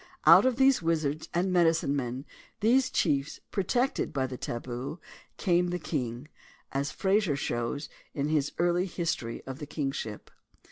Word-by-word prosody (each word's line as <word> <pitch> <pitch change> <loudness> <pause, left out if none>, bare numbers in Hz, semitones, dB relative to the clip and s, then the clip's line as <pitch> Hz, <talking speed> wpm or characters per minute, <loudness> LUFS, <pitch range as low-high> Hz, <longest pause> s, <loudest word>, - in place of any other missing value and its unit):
Out - - +8
of 255 - +2
these 265 -2 +4
wizards 155 -2 -1
and 180 +2 0
medicine 165 -5 +3
men, 130 0 -3 0.4
these 255 +4 +4
chiefs 145 -4 0
protected 245 +7 0
by 135 -2 0
the 130 0 -5
"tabu," 125 +5 -5 0.4
came 180 -1 +2
the 175 0 -1
king, 130 -5 -3 0.4
as 140 +1 -1
Mr. - - -14
Frazer 195 -5 +2
shows 135 +2 -2 0.3
in 140 0 0
his 150 -2 +1
Early 175 +2 +2
History 165 -10 -3
of 130 0 -6
the 150 - -6
Kingship. 135 -8 -4
155 Hz, 150 wpm, -29 LUFS, 135-180 Hz, 0.4 s, Out